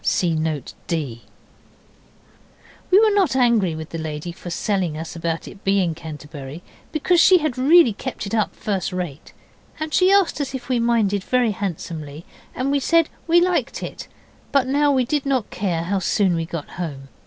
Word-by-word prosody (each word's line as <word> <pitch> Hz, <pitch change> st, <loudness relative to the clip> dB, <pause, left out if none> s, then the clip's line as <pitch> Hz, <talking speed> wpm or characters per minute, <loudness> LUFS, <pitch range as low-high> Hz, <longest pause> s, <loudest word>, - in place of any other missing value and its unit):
(See 175 Hz, -3 st, +1 dB
Note 155 Hz, -4 st, -2 dB
D.) 140 Hz, -9 st, -3 dB, 1.7 s
We 375 Hz, -, +7 dB
were 435 Hz, -1 st, +4 dB
not 380 Hz, -9 st, +2 dB
angry 235 Hz, -9 st, +3 dB
with 160 Hz, 0 st, -7 dB
the 165 Hz, -, -4 dB
lady 155 Hz, +1 st, -5 dB
for 175 Hz, -, -9 dB
selling 180 Hz, -3 st, -1 dB
us 160 Hz, +2 st, -6 dB
about 165 Hz, -1 st, -3 dB
it 195 Hz, -, -12 dB
being 195 Hz, -4 st, +2 dB
Canterbury, 150 Hz, -1 st, -9 dB, 0.3 s
because 340 Hz, +3 st, +2 dB
she 375 Hz, -, +7 dB
had 310 Hz, -7 st, -1 dB
really 280 Hz, -1 st, +5 dB
kept 205 Hz, -, -5 dB
it 200 Hz, -, -6 dB
up 215 Hz, -2 st, 0 dB
first 195 Hz, -3 st, -2 dB
rate. 175 Hz, -6 st, -5 dB, 0.5 s
And 310 Hz, -1 st, -4 dB
she 370 Hz, +1 st, +4 dB
asked 395 Hz, -6 st, +3 dB
us 275 Hz, -1 st, -3 dB
if 250 Hz, -1 st, -7 dB
we 250 Hz, -2 st, +2 dB
minded, 220 Hz, -4 st, +1 dB
very 250 Hz, -1 st, +2 dB
handsomely, 165 Hz, -5 st, -5 dB, 0.3 s
and 260 Hz, +2 st, -1 dB
we 285 Hz, -, +2 dB
said 330 Hz, +3 st, +3 dB, 0.2 s
we 340 Hz, +1 st, +6 dB
liked 360 Hz, 0 st, 0 dB
it. -, -, -7 dB, 0.4 s
But 275 Hz, -2 st, +3 dB
now 285 Hz, +2 st, +2 dB
we 260 Hz, -2 st, +2 dB
did 290 Hz, +3 st, 0 dB
not 265 Hz, -6 st, -1 dB
care 180 Hz, -4 st, -1 dB
how 195 Hz, +3 st, 0 dB
soon 190 Hz, 0 st, +2 dB
we 165 Hz, -1 st, -2 dB
got 165 Hz, -3 st, -5 dB
home. 140 Hz, -5 st, -6 dB
200 Hz, 180 wpm, -22 LUFS, 165-275 Hz, 1.7 s, We